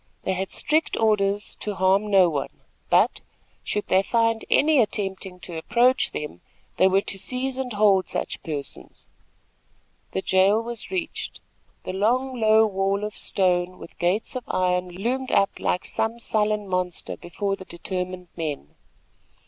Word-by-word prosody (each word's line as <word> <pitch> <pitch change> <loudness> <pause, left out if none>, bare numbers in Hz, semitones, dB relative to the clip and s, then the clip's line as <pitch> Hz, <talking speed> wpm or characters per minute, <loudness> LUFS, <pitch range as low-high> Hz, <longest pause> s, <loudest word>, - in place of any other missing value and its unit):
They 190 - 0
had 190 +1 -2
strict 310 +2 0
orders 205 -2 +1
to 210 -1 -3
harm 190 +3 +2
no 190 -3 +6
one; 145 -5 -4 0.3
but, - - +3 0.4
should 210 - -2
they 190 - +3
find 230 +2 +1
any 300 -1 +4
attempting 195 -3 -3
to 175 - -8
approach 240 +10 +2
them, 150 - -6 0.4
they 190 - +6
were 190 +1 +3
to 195 - -3
seize 255 +5 -2
and 260 -1 -3
hold 205 -2 +3
such - - -3
persons. 145 -3 -7 1.0
The 190 - -1
jail 190 +3 +4
was 235 -1 -5
reached. 360 -4 -4 0.4
The - - -5
long, 245 +5 0
low 220 0 +6
wall 195 0 0
of 210 0 -3
stone, 180 -1 0
with - - -13
gates 190 +9 0
of 255 - -3
iron, 180 0 0
loomed 240 +9 -2
up 195 - +3
like 180 - 0
some 225 +1 0
sullen 210 -2 0
monster 180 -1 -2
before 195 +3 -3
the 185 - -11
determined 180 0 -5
men. 150 - -4
Mr. - - -34
195 Hz, 155 wpm, -24 LUFS, 185-225 Hz, 1.0 s, no